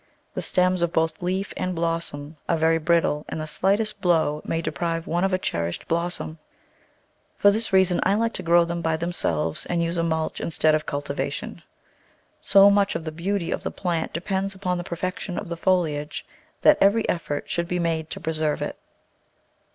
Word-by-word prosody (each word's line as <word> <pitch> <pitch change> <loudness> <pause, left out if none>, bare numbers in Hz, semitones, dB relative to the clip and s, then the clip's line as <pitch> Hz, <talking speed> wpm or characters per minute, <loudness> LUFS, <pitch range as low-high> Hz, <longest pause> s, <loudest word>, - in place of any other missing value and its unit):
The - - -3
stems 185 0 +1
of 170 -1 +1
both 160 -2 0
leaf 190 +3 -2
and 185 0 -2
blossom 165 -3 -2
are 170 - +3
very 160 +1 +3
brittle 160 -2 +2
and - - -4
the 155 - -3
slightest 200 +6 0
blow 160 -4 +2
may 165 - -1
deprive 165 +1 -2
one 175 +2 0
of 195 - +2
a 185 - +2
cherished 85 - -3
blos 170 +1 0
som. 155 +1 -7 1.0
For 205 - +6
this 220 +2 -1
reason 190 -2 +4
I 195 - +3
like 230 +2 0
to - - -4
grow 170 -1 +4
them 170 0 -3
by 160 -1 0
them 170 +2 -3
selves 80 - -1
and 170 -1 0
use 170 +1 -2
a 165 - +1
mulch 160 -1 -1
instead 155 -1 +2
of 155 0 0
cultivation. 145 0 -4 0.8
So 200 0 +7
much 200 0 +2
of 165 - -3
the 155 - -3
beauty 175 +2 -2
of - - -2
the - - -3
plant 170 -3 -2
depends 195 +3 -2
upon 180 -2 -2
the - - -3
perfection 180 +2 -4
of 195 - -5
the 170 - -3
foliage 160 -4 0 0.4
that 305 - +6
every 210 +3 +4
effort 145 -4 -2
should 170 0 -1
be 180 - -1
made 165 -2 -1
to - - -5
preserve 155 -2 -1
it. - - -5
170 Hz, 195 wpm, -24 LUFS, 160-185 Hz, 1.0 s, So